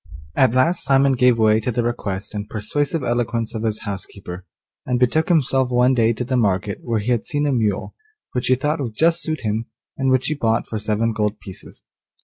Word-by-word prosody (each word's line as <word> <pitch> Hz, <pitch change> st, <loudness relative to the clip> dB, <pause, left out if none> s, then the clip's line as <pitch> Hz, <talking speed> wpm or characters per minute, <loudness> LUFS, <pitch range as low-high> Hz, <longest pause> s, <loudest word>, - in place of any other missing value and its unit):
At 130 Hz, -2 st, +3 dB
last 165 Hz, +8 st, +2 dB
Simon 135 Hz, 0 st, +4 dB
gave 125 Hz, -2 st, +4 dB
way 110 Hz, -1 st, +4 dB
to 120 Hz, +3 st, -2 dB
the 120 Hz, +1 st, 0 dB
request 105 Hz, -4 st, -3 dB
and 105 Hz, 0 st, -5 dB
persuasive 145 Hz, +8 st, -2 dB
eloquence 120 Hz, -2 st, -1 dB
of 110 Hz, -, -4 dB
his 110 Hz, -1 st, -2 dB
housekeeper, 95 Hz, -2 st, -7 dB, 0.4 s
and 125 Hz, -1 st, -1 dB
betook 130 Hz, +6 st, +2 dB
himself 135 Hz, -6 st, +2 dB
one 125 Hz, +1 st, +3 dB
day 115 Hz, -2 st, +3 dB
to 115 Hz, +2 st, -3 dB
the 130 Hz, -, -1 dB
market 100 Hz, -3 st, 0 dB
where 115 Hz, -2 st, -1 dB
he 110 Hz, +4 st, -1 dB
had 120 Hz, -3 st, +1 dB
seen 145 Hz, -3 st, -1 dB
a 145 Hz, -, +1 dB
mule, 110 Hz, -6 st, 0 dB, 0.4 s
which 125 Hz, -, -2 dB
he 130 Hz, -, +5 dB
thought 150 Hz, +5 st, -1 dB
would 115 Hz, -5 st, -4 dB
just 165 Hz, +4 st, +2 dB
suit 155 Hz, -1 st, -3 dB
him, 110 Hz, +1 st, -2 dB, 0.3 s
and 135 Hz, 0 st, +1 dB
which 130 Hz, 0 st, +2 dB
he 155 Hz, -, +1 dB
bought 115 Hz, -5 st, 0 dB
for 110 Hz, -, -4 dB
seven 110 Hz, +2 st, 0 dB
gold 105 Hz, 0 st, -1 dB
pieces. 95 Hz, -3 st, -11 dB
120 Hz, 210 wpm, -21 LUFS, 110-130 Hz, 0.4 s, he